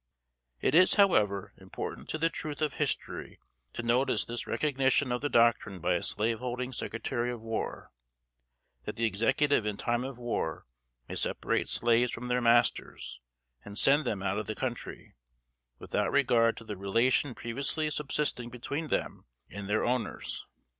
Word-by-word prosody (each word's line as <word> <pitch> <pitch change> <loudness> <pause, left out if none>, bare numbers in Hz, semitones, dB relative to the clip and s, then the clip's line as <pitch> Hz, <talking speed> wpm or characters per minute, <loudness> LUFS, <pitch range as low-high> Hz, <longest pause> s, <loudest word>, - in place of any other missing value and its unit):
It - - +2
is, 180 +3 +6
however, 105 - +3
important - - -7
to - - -1
the 165 +1 +1
truth 150 -2 -5
of 150 - 0
history - - -2 0.3
to 120 - -4
notice 125 +3 +2
this 120 +1 -3
recognition 135 -2 +1
of 125 - -1
the 145 - -1
doctrine 115 -5 +3
by 85 0 0
a 90 - 0
slave 110 +1 +2
holding 125 +1 -4
Secretary 120 +1 -2
of 120 -2 -7
War, 115 -1 -4 0.9
that - - -4
the 115 - 0
Executive 115 +6 +2
in 105 -1 -3
time 120 +2 0
of 130 -1 -6
war 120 -10 -3 0.4
may - - -7
separate - - -1
slaves 120 +1 +3
from 125 +1 -5
their 125 0 +1
masters, 120 - +1 0.4
and 100 0 -9
send 145 +6 +5
them 100 -5 -2
out 100 +1 0
of 110 - -5
the 110 - -3
country, 120 -1 -5 0.6
without - - -1
regard 120 -5 +3
to - - -8
the 105 -2 -6
relation 115 +7 +2
previously 140 +6 -1
subsisting 140 -4 -1
between 140 +6 -4
them - - -2 0.3
and 100 0 -7
their 105 +1 +1
owners. 125 -2 -2
120 Hz, 160 wpm, -30 LUFS, 110-135 Hz, 0.9 s, is